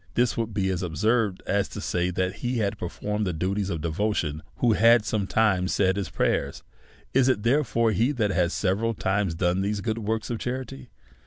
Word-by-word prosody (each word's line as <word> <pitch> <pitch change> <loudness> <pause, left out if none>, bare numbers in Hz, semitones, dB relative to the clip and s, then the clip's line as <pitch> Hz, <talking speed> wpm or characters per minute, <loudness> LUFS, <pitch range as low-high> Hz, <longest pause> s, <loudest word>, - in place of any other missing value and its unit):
This 120 -2 +2
would 115 -1 -2
be 100 -2 0
as 90 -1 -2
absurd 100 +4 0
as 100 0 +1
to - - -8
say 90 0 -1
that 90 0 -2
he 125 0 -2
had 105 -2 -1
performed 105 +4 -3
the 90 - -1
du 95 +4 -1
ties 100 -1 -2
of 85 -4 -3
devotion 80 -3 -1
who 120 -2 +2
had 115 +2 +5
sometimes 100 -2 +1
said 95 -1 +2
his 100 -5 -3
prayers. - - -1 0.5
Is 135 0 +4
it, 105 -5 +1
therefore, 115 -3 +2
he 115 +7 +2
that 110 -6 0
has 90 -1 +1
several 105 +5 0
times 95 -3 0
done 90 +2 +1
these 100 +1 -1
works 110 0 -2
of 115 - -3
charity 125 - -5
105 Hz, 190 wpm, -26 LUFS, 90-115 Hz, 0.5 s, had